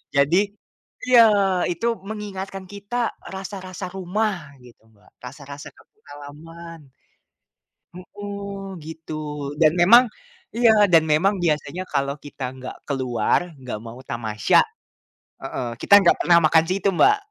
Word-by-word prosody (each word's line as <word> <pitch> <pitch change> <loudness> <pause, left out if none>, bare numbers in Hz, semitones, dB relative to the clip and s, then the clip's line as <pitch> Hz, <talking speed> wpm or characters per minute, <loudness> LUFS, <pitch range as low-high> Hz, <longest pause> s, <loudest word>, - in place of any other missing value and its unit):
Jadi 140 +4 +3 0.7
iya 255 -1 +6 0.5
itu 175 +6 -4 0.2
mengingatkan 195 -3 -6
kita 205 +3 -8 0.4
rasa-rasa 190 -1 -7
rumah 200 +4 -1 0.3
gitu 120 -1 -18
Mbak, 105 0 -25
rasa-rasa 140 +2 -10
kampung 220 - -25
halaman. 165 +4 -11 1.1
Hmm, 200 0 -8
gitu. 160 0 -9 0.5
Dan 155 -2 +5
memang 235 +8 +8 0.5
iya, 235 -1 +5 0.2
dan 165 -2 +6
memang 160 +6 +2
biasanya 165 +3 -1
kalau 140 0 -1
kita 145 -2 -9
nggak 130 0 -8
keluar, 130 -6 0 0.2
nggak 125 -4 -6
mau 115 +2 -9
tamasya 110 -2 +1 0.8
heeh, 130 -2 -4
kita - - +2
nggak 175 - +4
pernah 170 -1 +4
makan 160 +1 +5
situ 195 +1 0
Mbak. 420 +1 +5
170 Hz, 120 wpm, -22 LUFS, 140-195 Hz, 1.1 s, memang